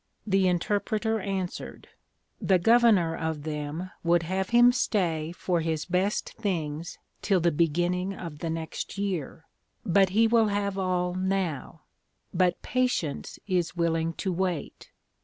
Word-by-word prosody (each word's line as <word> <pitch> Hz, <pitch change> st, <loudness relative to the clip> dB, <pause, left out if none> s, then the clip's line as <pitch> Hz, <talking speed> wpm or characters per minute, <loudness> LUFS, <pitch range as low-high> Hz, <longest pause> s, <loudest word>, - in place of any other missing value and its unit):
The 195 Hz, -2 st, +2 dB
Interpreter 210 Hz, +5 st, 0 dB
answered, 190 Hz, -2 st, -5 dB, 0.5 s
The 190 Hz, -, +4 dB
Governor 210 Hz, -4 st, +4 dB
of 160 Hz, -2 st, -3 dB
them 155 Hz, +4 st, -4 dB
would 170 Hz, 0 st, +3 dB
have 190 Hz, +3 st, -2 dB
him 240 Hz, +1 st, +6 dB
stay 170 Hz, -10 st, 0 dB
for 175 Hz, -1 st, -1 dB
his 160 Hz, -1 st, -2 dB
best 185 Hz, +3 st, -1 dB
things 165 Hz, -5 st, -3 dB, 0.2 s
till 195 Hz, -3 st, +2 dB
the 170 Hz, 0 st, +2 dB
beginning 175 Hz, +4 st, +1 dB
of 165 Hz, -5 st, -8 dB
the 165 Hz, -, -3 dB
next 160 Hz, +4 st, -5 dB
year; 180 Hz, -5 st, -3 dB, 0.4 s
but 190 Hz, +1 st, +4 dB
he 220 Hz, +5 st, +3 dB
will 225 Hz, -1 st, +4 dB
have 200 Hz, -1 st, -1 dB
all 180 Hz, -2 st, 0 dB
now; 185 Hz, -5 st, -2 dB, 0.5 s
but 180 Hz, -1 st, +2 dB
Patience 250 Hz, -, -1 dB
is 180 Hz, -4 st, -1 dB
willing 165 Hz, -1 st, 0 dB
to 190 Hz, +2 st, -2 dB
wait. 180 Hz, -4 st, -3 dB
180 Hz, 135 wpm, -27 LUFS, 165-195 Hz, 0.5 s, him